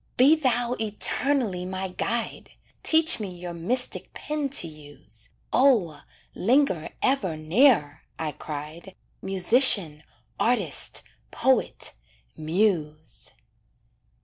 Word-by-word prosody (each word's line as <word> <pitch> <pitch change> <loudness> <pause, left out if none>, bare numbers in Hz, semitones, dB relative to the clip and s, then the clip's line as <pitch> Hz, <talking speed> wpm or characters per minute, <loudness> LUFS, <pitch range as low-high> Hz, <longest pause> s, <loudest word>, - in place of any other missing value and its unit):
"Be 275 +5 +5
thou 245 -5 -1
eternally 220 -1 0
my 190 +1 -5
guide, 230 +5 -4 0.3
Teach 320 -1 +5
me 190 -4 -7
your 175 0 -8
mystic 240 +10 -2
pen 300 -2 -4
to 260 -11 +2
use! 145 -7 -13 0.2
O! 220 - +2 0.3
linger 225 - 0
ever 200 - 0
near," 160 - +2 0.2
I 155 -1 -4
cried, 155 +6 -9 0.3
"Musician, 190 - +4 0.4
artist, 245 +2 +1 0.3
poet 265 -1 0 0.4
muse!" 155 -2 -3
190 Hz, 95 wpm, -24 LUFS, 160-255 Hz, 0.4 s, Be